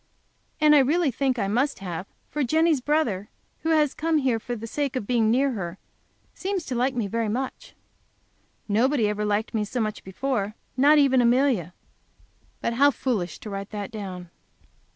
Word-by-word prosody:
And 305 Hz, -1 st, +6 dB
I 295 Hz, -, +7 dB
really 295 Hz, +3 st, +2 dB
think 260 Hz, +1 st, 0 dB
I 200 Hz, -, 0 dB
must 250 Hz, +8 st, +1 dB
have, 185 Hz, -1 st, -5 dB, 0.2 s
for 295 Hz, -, -2 dB
Jenny's 315 Hz, +1 st, +2 dB
brother, 245 Hz, -9 st, 0 dB, 0.3 s
who 320 Hz, -, -2 dB
has 305 Hz, -3 st, +3 dB
come 320 Hz, +1 st, 0 dB
here 260 Hz, -5 st, +1 dB
for 245 Hz, +2 st, -5 dB
the 225 Hz, 0 st, -7 dB
sake 280 Hz, +3 st, -2 dB
of 255 Hz, -, -2 dB
being 225 Hz, -1 st, +2 dB
near 265 Hz, +4 st, +3 dB
her, 190 Hz, -6 st, -5 dB, 0.6 s
seems 385 Hz, -2 st, -3 dB
to -, -, -4 dB
like 255 Hz, +2 st, +1 dB
me 235 Hz, -4 st, 0 dB
very 225 Hz, +2 st, -1 dB
much. 255 Hz, +5 st, -4 dB, 0.9 s
Nobody 230 Hz, +3 st, +2 dB
ever 210 Hz, 0 st, -1 dB
liked 210 Hz, +3 st, -1 dB
me 220 Hz, -2 st, 0 dB
so 225 Hz, +4 st, -4 dB
much 215 Hz, -2 st, -2 dB
before, 210 Hz, +1 st, -2 dB, 0.2 s
not 285 Hz, +4 st, +5 dB
even 270 Hz, -3 st, +5 dB
Amelia. 240 Hz, -, +2 dB, 0.9 s
But 235 Hz, -, -1 dB
how 280 Hz, +4 st, +5 dB
foolish 215 Hz, -, -2 dB
to 215 Hz, -, -7 dB
write 195 Hz, 0 st, -5 dB
that 205 Hz, -1 st, -5 dB
down! 185 Hz, -5 st, -7 dB
245 Hz, 175 wpm, -25 LUFS, 210-280 Hz, 0.9 s, I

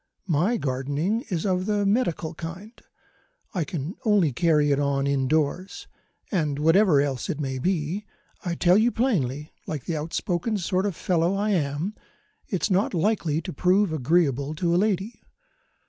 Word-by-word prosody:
My 185 Hz, +7 st, +1 dB
gardening 145 Hz, -, -1 dB
is 175 Hz, -1 st, -2 dB
of 185 Hz, 0 st, 0 dB
the 205 Hz, -1 st, +1 dB
medical 195 Hz, -7 st, 0 dB
kind 170 Hz, +7 st, -8 dB, 0.8 s
I 180 Hz, -5 st, 0 dB
can 165 Hz, 0 st, -4 dB
only 200 Hz, -, +3 dB
carry 150 Hz, -1 st, +3 dB
it 140 Hz, -, +2 dB
on 140 Hz, -1 st, +1 dB
indoors 140 Hz, +6 st, 0 dB, 0.5 s
and 155 Hz, -8 st, 0 dB
whatever 165 Hz, +1 st, +4 dB
else 130 Hz, -6 st, -3 dB
it 150 Hz, -, -2 dB
may 135 Hz, -3 st, -3 dB
be, 180 Hz, +5 st, -1 dB, 0.4 s
I 175 Hz, -2 st, -2 dB
tell 180 Hz, +4 st, +4 dB
you 235 Hz, +2 st, +3 dB
plainly, 150 Hz, -, -1 dB
like 150 Hz, -4 st, -4 dB
the 165 Hz, -, -2 dB
outspoken 175 Hz, +7 st, -2 dB
sort 185 Hz, +1 st, 0 dB
of 195 Hz, -, -3 dB
fellow 175 Hz, +2 st, +1 dB
I 210 Hz, +2 st, 0 dB
am, 155 Hz, +2 st, -1 dB, 0.5 s
it's 195 Hz, +1 st, -1 dB
not 190 Hz, +1 st, +2 dB
likely 170 Hz, -4 st, 0 dB
to -, -, -5 dB
prove 185 Hz, +3 st, +2 dB
agreeable 150 Hz, -1 st, +1 dB
to 170 Hz, +1 st, 0 dB
a -, -, +3 dB
lady. 200 Hz, +2 st, -1 dB
170 Hz, 155 wpm, -25 LUFS, 150-195 Hz, 0.8 s, whatever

